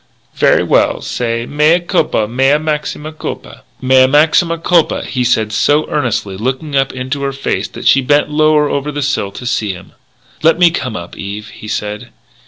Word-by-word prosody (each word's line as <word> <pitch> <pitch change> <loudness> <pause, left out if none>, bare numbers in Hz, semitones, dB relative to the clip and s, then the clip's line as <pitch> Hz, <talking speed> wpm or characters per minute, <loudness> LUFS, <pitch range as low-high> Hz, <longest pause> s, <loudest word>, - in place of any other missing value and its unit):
"Very - - +3
well. - - +1
Say 115 -1 -2
'Mea 150 +5 +3
culpa, 170 - 0
mea 135 +5 +2
maxima 155 0 -3
culpa.'" 155 - -7 0.2
"Mea 130 0 +5
maxima 160 +4 +3
culpa," 165 0 +1
he 125 -2 -2
said 110 -3 +1
so 145 +7 +2
earnestly, 120 - -2
looking 130 +6 -3
up 135 0 +1
into 130 +2 -4
her 140 0 -1
face 135 0 -2
that - - -10
she 135 - +5
bent 145 +3 +2
lower 155 0 +3
over 145 +1 -2
the 145 0 -3
sill 130 -8 -1
to 125 - -9
see 110 -4 -1
him. 90 +1 -13 0.5
"Let 165 +1 +4
me 175 -1 +5
come 130 -8 -4
up, 85 -3 -7
Eve," 105 +2 -7
he 105 - -11
said. 105 -1 -4
135 Hz, 180 wpm, -15 LUFS, 115-150 Hz, 0.5 s, Mea